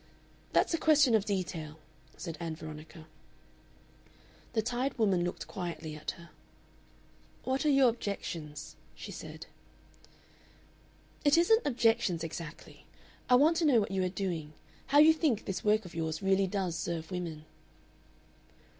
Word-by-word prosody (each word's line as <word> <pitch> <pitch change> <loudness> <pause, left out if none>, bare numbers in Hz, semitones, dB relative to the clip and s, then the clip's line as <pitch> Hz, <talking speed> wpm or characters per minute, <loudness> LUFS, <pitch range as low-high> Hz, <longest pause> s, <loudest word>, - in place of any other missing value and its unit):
"That's - - +2
a 330 - +1
question 295 -6 +5
of 215 -2 +3
detail," 170 -6 -3 0.4
said 165 - -5
Ann 165 -2 -4
Veronica. 155 +1 -10 1.5
The 220 - +1
tired 250 +4 -2
woman 195 -6 +2
looked 175 - -4
quietly 170 -3 -5
at 150 +4 -5
her. 170 -1 -14 1.1
"What 265 +4 0
are - - +5
your 275 -3 +6
objections?" 160 -9 -5 0.2
she - - -8
said. - - -8 1.8
"It 290 +1 +5
isn't 445 +6 +4
objections 225 - +2
exactly. 165 -1 -8 0.4
I 250 - +7
want 310 +6 +5
to 335 - +2
know 265 -6 +5
what 200 -2 -2
you 190 -1 0
are 185 - 0
doing; 175 -6 -4 0.3
how 280 +2 +3
you 310 +2 +8
think 300 -9 0
this 190 - -3
work 215 0 +2
of 180 - -10
yours 160 +1 -3
really 195 0 +3
does 185 -3 -2
serve 165 0 -4
women." 165 -4 -5
195 Hz, 140 wpm, -31 LUFS, 165-250 Hz, 1.8 s, you